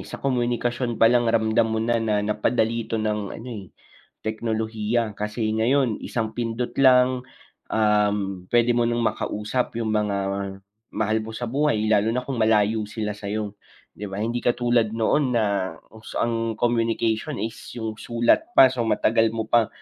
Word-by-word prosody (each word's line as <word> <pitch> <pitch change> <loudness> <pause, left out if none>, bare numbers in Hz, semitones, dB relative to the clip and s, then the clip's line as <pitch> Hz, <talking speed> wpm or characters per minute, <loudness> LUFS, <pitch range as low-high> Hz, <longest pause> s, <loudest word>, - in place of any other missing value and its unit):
sa - - -6
komunikasyon 120 -2 -1
palang 120 +1 +4
ramdam 110 0 +2
mo 110 - -1
na 115 +1 +1
na 105 -2 0
napadali 110 +1 0
ito 115 - -1
ng 105 -2 -2
ano, 120 - -9
eh, 100 -5 -8 0.6
teknolohiya. 110 0 -1
Kasi 105 +2 -2
ngayon, 115 +1 +1
isang 110 -2 -3
pindot 120 +1 -3
lang, 130 -1 +5 0.5
um, 105 -3 +1
puwede 120 0 +3
mo 120 -1 +2
ng 120 0 0
makausap 110 +3 -2
yung 115 -2 -1
mga 105 -2 0 0.8
mahal 110 0 +1
mo 110 0 -7
sa 125 - -4
buhay, 120 -3 +1
lalo 105 +1 +3
na 125 - -2
kung 130 -4 -4
malayo 110 0 +3
sila 105 -1 -3
sa'yo 105 0 -4 0.4
'di 105 - -7
ba. 100 +3 -3
Hindi 120 +2 -2
katulad 120 -2 +2
noon 125 +3 +1
na 100 -6 0 0.2
os 110 0 -11
ang 115 -1 -1
communication 115 +3 0
is 110 -1 -4 0.2
yung 110 -2 -3
sulat 120 - +2 0.2
pa 130 -1 +8
so, 125 - -3
matagal 110 0 +3
mo 110 - -1
pa 115 0 +3
115 Hz, 155 wpm, -24 LUFS, 110-120 Hz, 0.8 s, pa